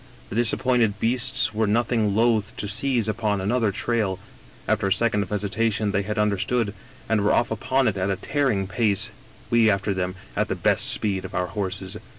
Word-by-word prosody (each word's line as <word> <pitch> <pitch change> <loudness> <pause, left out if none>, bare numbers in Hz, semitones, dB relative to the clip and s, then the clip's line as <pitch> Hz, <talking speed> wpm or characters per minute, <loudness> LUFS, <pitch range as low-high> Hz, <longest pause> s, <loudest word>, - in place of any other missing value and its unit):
The - - -6
disappointed 120 -2 +2
beasts 130 +1 +1
were 110 0 +1
nothing 110 -1 +1
loath 115 0 +1
to 105 - -3
seize 120 +2 +1
upon 110 -2 0
another 110 +2 +1
trail; 105 -3 -1 0.5
after 100 - +1
a - - -1
second 105 0 +2
of 95 - -4
hesitation 105 +1 0
they 100 - +1
had 105 +2 -4
understood, 105 +2 0 0.3
and 110 -2 +2
were 105 - +3
off 120 - +2
upon 130 +4 +1
it 100 -3 0
at 95 +2 0
a 100 - +1
tearing 115 -1 0
pace, 100 0 0 0.4
we 115 -2 +5
after 100 0 +1
them 90 0 -2 0.2
at - - +1
the - - -2
best - - +1
speed 100 -3 -1
of - - -8
our 90 - +1
horses. 95 -1 -4
105 Hz, 185 wpm, -24 LUFS, 100-115 Hz, 0.5 s, we